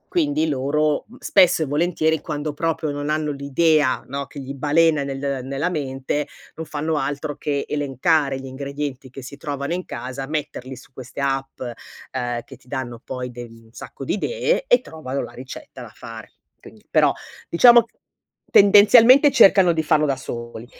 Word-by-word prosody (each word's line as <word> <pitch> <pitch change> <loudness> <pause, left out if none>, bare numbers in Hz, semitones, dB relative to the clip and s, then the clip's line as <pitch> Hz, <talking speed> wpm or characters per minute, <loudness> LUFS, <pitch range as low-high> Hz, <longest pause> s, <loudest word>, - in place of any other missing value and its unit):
Quindi 290 - +1
loro 145 +2 0
spesso 180 -4 +4
e 155 - +1
volentieri 160 +1 0
quando 150 -1 -4
proprio 160 0 -2
non 145 +1 -4
hanno 155 -1 -1
l'idea, 140 0 +1
no, 140 +1 -5
che 145 - -10
gli 135 +1 -6
balena 150 +1 +2
nel 135 -1 -3
nella 140 +5 -2
mente, 145 -1 -3 0.3
non 160 - -6
fanno 155 +1 -2
altro 145 +1 -3
che 145 -1 -2
elencare 145 0 0
gli 135 - -9
ingredienti 140 0 -6
che 135 +2 -10
si 135 +3 -9
trovano 140 +2 -4
in 180 +1 -3
casa, 130 +1 -6
metterli 135 -3 -5
su 130 0 -17
queste 130 +2 -10
app, 135 -1 -2
uhm, 120 0 -6
che - - -12
ti 125 - -23
danno 120 -4 -5
poi 125 -1 -5
de 120 0 -8
un 115 -1 -15
sacco 135 - -9
di - - -1
idee 485 - 0
e - - +5
trovano 140 -4 -6
la - - -8
ricetta 130 0 -10
da 115 -3 -10
fare. 115 -1 -11 0.3
Quindi, - - -16
però - - +4 0.4
diciamo, 235 +7 +7 0.7
tendenzialmente 230 +8 +7
cercano 190 -8 +6
di 160 - -1
farlo 155 0 +2
da 140 -2 0
soli, 120 -2 -7
145 Hz, 165 wpm, -21 LUFS, 130-160 Hz, 0.7 s, diciamo